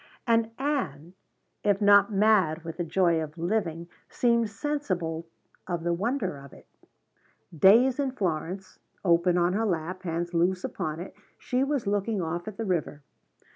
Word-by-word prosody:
And 230 -2 +2
Ann, 185 - -2 0.5
if 205 -2 +2
not 205 0 +5
mad 195 -6 +3
with 165 -1 -7
the 175 - -1
joy 170 -1 +2
of 155 +1 -7
living, 170 -2 -2 0.2
seemed 235 -2 +2
sensible 185 - -3 0.4
of 175 -2 -3
the 170 0 +1
wonder 200 - -1
of 140 0 -13
it. - - -16 0.9
"Days 235 - +5
in 275 -1 +1
Florence" 185 -3 -4 0.3
open 170 0 +3
on 175 +1 +2
her 220 +2 0
lap, 180 0 -2
hands 175 0 -3
loose 180 +2 +1
upon 155 +1 -4
it, 185 - -8 0.2
she 250 +1 -1
was 275 -3 -1
looking 205 +1 0
off 175 +1 -3
at 210 -2 -7
the 225 - -3
river. 160 -6 -2
185 Hz, 155 wpm, -27 LUFS, 170-220 Hz, 0.9 s, not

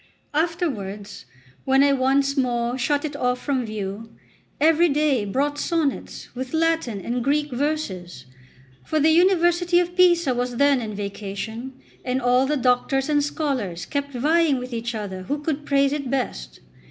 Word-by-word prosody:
Afterwards, 260 - -3 0.4
when 270 +1 +4
I 280 0 +4
once 275 +1 +2
more 240 -2 0
shut 285 +4 0
it 295 -1 -5
off 250 -3 0
from 260 -4 -1
view, 210 +1 -5 0.5
every 325 +3 +4
day 285 -6 +1
brought 285 +8 -1
sonnets, 320 -5 -2
with 260 +4 -5
Latin 320 -9 0
and 240 +5 -3
Greek 295 +2 0
verses; 225 - -3 0.6
for 310 - -1
the 310 +2 +4
University 345 0 +3
of 355 0 -2
Pisa 345 -6 +4
was 245 0 -2
then 280 0 +3
in 215 -2 -5
vacation, 210 +5 -5 0.3
and 255 0 -1
all 250 +1 +3
the 300 +1 +1
doctors 260 +2 +1
and 290 -1 +2
scholars 255 - -2
kept 285 +3 -3
vying 305 +3 +2
with 250 0 -6
each 235 0 -3
other 195 -3 -5
who 240 +11 -2
could 295 0 -3
praise 275 0 +3
it 280 -3 -3
best. 65 - -3
270 Hz, 155 wpm, -23 LUFS, 235-300 Hz, 0.6 s, when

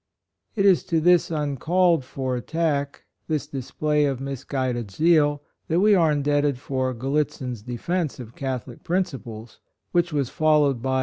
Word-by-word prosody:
It 200 -2 +1
is 190 -3 +5
to 165 - +1
this 175 +2 +4
uncalled 160 +2 +1
for 130 0 -3
attack 145 +1 -2
— - - -50
this 155 -3 -1
display 150 +2 -1
of 135 -3 -1
mis 135 -2 -5
guided 125 -5 -2
zeal 145 - +2 0.2
that 165 +2 +1
we 210 +2 +5
are 165 -5 +4
indebted 145 -1 +1
for 130 -1 -2
"Gallitzin's 135 -2 -2
Defence 140 - -3
of 120 -2 -9
Catholic 130 -3 -5
Principles," 125 - -4 0.3
which 175 -1 +1
was 140 -4 -1
followed 150 -5 +2
by 135 - -2
OF - - +1
RELIGION. 130 - +2
145 Hz, 165 wpm, -24 LUFS, 130-160 Hz, 0.3 s, is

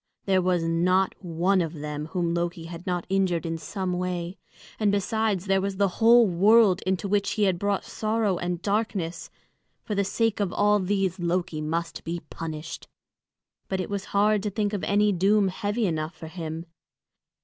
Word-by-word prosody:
There 190 -1 +3
was 180 -2 +1
not 180 +3 +2
one 180 +3 +1
of 165 -1 -3
them 150 -1 -5
whom 170 0 -1
Loki 170 0 -2
had 170 +2 -9
not 180 -2 -1
injured 190 -3 +1
in 165 0 -3
some 185 +1 -3
way; 180 0 -3 0.4
and 210 -2 +3
besides, 205 -1 0
there 195 -1 +2
was 195 0 -3
the 200 0 +3
whole 235 +1 +7
world 200 +1 +5
into 190 +2 0
which 200 0 +1
he 215 - 0
had 185 -3 +2
brought 200 0 0
sorrow 215 -4 -1
and 175 -1 -2
darkness; 200 -5 -2 0.5
for 215 - -4
the 200 0 +1
sake 225 +2 0
of 200 -3 0
all 210 +1 +3
these 190 -1 0
Loki 175 -2 -1
must 165 +2 -3
be 170 +1 -3
punished. 160 -1 -6 0.8
But 190 - -2
it 185 - -4
was 200 -1 -3
hard 210 +1 +2
to 210 - -2
think 205 0 -1
of 195 -5 -2
any 205 +2 +3
doom 195 +2 +3
heavy 205 +4 -1
enough 160 -2 -2
for 160 0 -9
him. 160 -1 -6
185 Hz, 180 wpm, -26 LUFS, 170-205 Hz, 0.8 s, whole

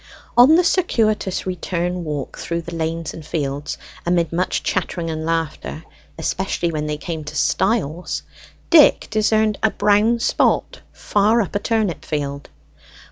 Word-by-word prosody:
On 255 +6 +8
the 355 - +4
circuitous 220 - +1
return 180 -1 -2
walk 150 -4 -4
through 170 0 -3
the 170 - -8
lanes 165 0 -3
and 160 - -9
fields, 145 -2 -3 0.3
amid 170 -1 +1
much 180 +2 -1
chattering 175 -3 -2
and 160 0 -4
laughter, 165 -1 -3 0.3
especially 175 +1 -1
when 150 -1 -3
they 150 0 -2
came 160 0 -5
to 150 +1 -8
stiles, 180 +1 0 0.5
Dick 315 -4 +6
discerned 215 0 +2
a 220 - +4
brown 210 +3 +3
spot 235 - +1
far 210 +3 +2
up 205 - -1
a 205 - 0
turnip 215 -5 -1
field. 140 -2 -4
175 Hz, 140 wpm, -20 LUFS, 160-215 Hz, 0.5 s, On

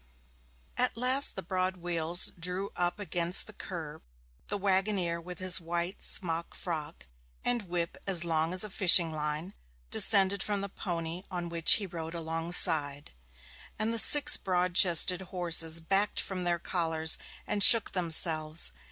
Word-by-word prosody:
At - - -2
last 255 +3 +2
the 190 - -8
broad 185 +1 -5
wheels 170 0 0
drew 180 +3 -6
up 175 +1 -4
against 180 -3 0
the 215 - -14
kerb, 160 -6 -11 0.5
the 205 - -5
waggoner 190 -3 -3
with 180 +1 -11
his 185 -1 +3
white 170 +2 -6
smock 170 -2 -2
frock, 160 -3 -9 0.4
and 240 -5 -2
whip 170 -1 -6
as 180 -3 +1
long 165 0 -3
as 185 +1 +5
a 210 - -9
fishing 175 -3 +4
line, 155 +4 -7 0.4
descended 195 0 +2
from 205 -1 -4
the 200 - -7
pony 170 -2 -7
on 175 -1 -7
which 170 -1 +4
he 210 - +1
rode 165 -2 -10
alongside, 160 -3 -1 0.7
and 220 +2 -4
the 230 - +3
six 295 +5 +6
broad 180 -1 -4
chested 180 0 +4
horses 170 -3 0
backed 195 +5 -2
from 185 -2 -5
their 175 0 -2
collars 160 -2 0 0.3
and 205 -1 +1
shook 230 -3 +8
themselves. 160 - +4
175 Hz, 150 wpm, -26 LUFS, 165-190 Hz, 0.7 s, shook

